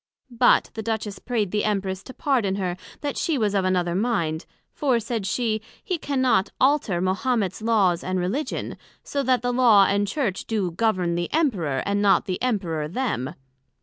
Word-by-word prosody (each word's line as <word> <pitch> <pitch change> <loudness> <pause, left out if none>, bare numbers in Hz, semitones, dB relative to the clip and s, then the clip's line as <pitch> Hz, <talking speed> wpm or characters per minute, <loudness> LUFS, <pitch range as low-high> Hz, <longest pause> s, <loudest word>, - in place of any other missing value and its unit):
But 240 +1 +3
the 220 - -4
Duchess 220 -2 -3
pray'd 220 -6 -1
the 210 - 0
Empress 195 -3 -1
to 260 - -9
pardon 235 -9 +1
her 185 -3 -2 0.3
that 290 -1 -3
she 325 -4 0
was 210 -4 +1
of 195 -2 +2
another 180 -2 +1
mind; 175 -7 -1 0.3
for, 260 -5 +1
said 225 -3 -3
she, 220 0 0 0.2
he 360 -3 -2
cannot 260 -8 +1
alter 260 -10 +2
Mahomets 195 +2 0
Laws 200 -6 +2
and 185 0 -1
Religion; 210 +13 -3 0.3
so 280 - -2
that 255 -2 +1
the 245 0 0
Law 230 -6 +6
and 200 +1 +1
Church 210 -6 -2
do 205 -6 -1
govern 185 -2 0
the 175 0 -2
Emperor, 190 - 0
and 200 0 0
not 195 -3 +4
the 185 -1 -3
Emperor 180 -11 -1
them. 170 - -2
205 Hz, 175 wpm, -24 LUFS, 185-245 Hz, 0.3 s, Law